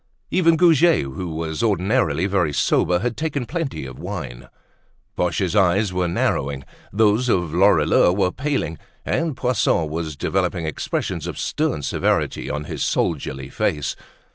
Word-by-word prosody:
Even 165 -3 +4
Goujet, 170 -1 +5
who 70 +6 -5
was 80 -1 -3
ordinarily 105 -2 +1
very 95 -6 +1
sober, 90 +5 +2
had 120 0 -1
taken 145 -4 -2
plenty 165 0 -4
of - - -9
wine. - - -6 0.7
Boche's 90 +2 0
eyes 95 0 +3
were 90 -1 0
narrowing, 70 -5 -1 0.3
those 110 +4 +2
of 90 -7 +1
Lorilleux 95 -1 +4
were 95 -1 +1
paling, 135 - -2 0.3
and 160 -5 -1
Poisson 125 -10 +1
was 80 -1 -4
developing 90 +3 -1
expressions 80 - -3
of - - -5
stern 75 - -1
severity - - 0
on 75 0 -3
his - - -4
soldierly 70 -3 -1
face. 75 +1 -1
90 Hz, 140 wpm, -22 LUFS, 80-120 Hz, 0.7 s, Goujet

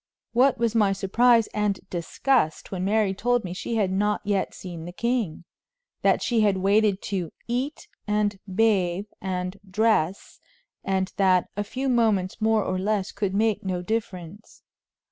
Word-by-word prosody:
What 255 +3 +4
was 230 -1 0
my 210 -4 +3
surprise 230 +4 +3
and 210 -2 0
disgust 175 - 0
when 185 -2 -3
Mary 205 0 +2
told 245 +4 +1
me 180 -2 -5
she 230 +5 -4
had 200 -4 +1
not 205 +2 +1
yet 200 -2 0
seen 170 -3 -8
the 175 - -6
king 230 -5 -2 0.6
that - - +2
she 235 -3 +2
had 205 -2 +3
waited 200 +1 +2
to 175 -5 -2 0.2
"eat, 255 +5 -3 0.2
and 210 -1 0
bathe, 195 -3 +2 0.2
and 185 0 -3
dress," 200 -3 0 0.4
and 190 0 -1
that 185 -3 +3
"a 205 - -1
few 260 +6 -4
moments 220 -7 +1
more 220 -1 +3
or 185 0 -2
less 200 0 -1
could 200 -2 -2
make 220 0 +1
no 185 -2 -2
difference." 200 -2 -5
205 Hz, 155 wpm, -25 LUFS, 185-225 Hz, 0.6 s, What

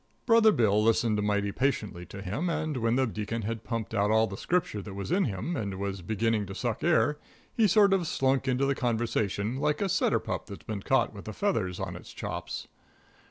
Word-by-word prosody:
Brother 230 -2 +6
Bill 105 - +3
listened 110 -1 +2
mighty 100 -1 0
patiently 105 -9 -1
to 100 +2 -8
him, 115 - -2
and 155 -2 -1
when 115 0 +1
the 130 0 +3
Deacon 110 0 -3
had 115 +2 -3
pumped 115 -3 -4
out 105 -1 +2
all 110 +1 +4
the 100 - -6
Scripture 160 - -1
that 100 -1 -8
was 100 +8 -5
in 190 +3 +3
him, 110 - -3
and 100 -6 -3
was 100 -1 -3
beginning 110 +2 0
to 95 - -7
suck 115 0 -2
air, 150 -3 +3 0.3
he 225 -2 +4
sort 200 0 +5
of 180 -4 +1
slunk 135 -2 +1
into 130 +1 +2
the 140 - +2
conversation 115 -3 -1
like 150 +2 0
a 200 - +1
setter 185 - +2
pup - - -4
that's - - -9
been 105 -2 -4
caught 130 +2 +2
with 100 - -10
the 110 - -6
feathers 105 - -1
on - - -4
its - - -11
chops. - - -5
115 Hz, 210 wpm, -28 LUFS, 100-140 Hz, 0.3 s, Brother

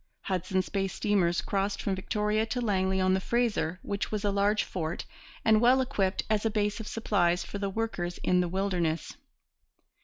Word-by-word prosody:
Hudson's 185 0 -1
Bay 195 -1 0
steamers 190 -3 +1
crossed 200 0 -1
from 200 - -1
Victoria 210 +3 0
to 245 - -2
Langley 190 -4 +1
on 185 0 +3
the 190 - +2
Fraser, 200 -7 0
which 200 0 -3
was 210 -1 -2
a 205 - +2
large 200 +1 +2
fort 165 -2 -4 0.4
and 220 -1 +5
well 250 +2 +5
equipped 205 -7 0
as 215 -2 +1
a 225 - +2
base 210 0 0
of 220 - -6
supplies 180 -6 +1
for 200 - -6
the 200 -1 -1
workers 190 -5 -3
in 180 0 +3
the 175 - -1
wilderness. 175 -4 -1
200 Hz, 180 wpm, -29 LUFS, 185-215 Hz, 0.4 s, and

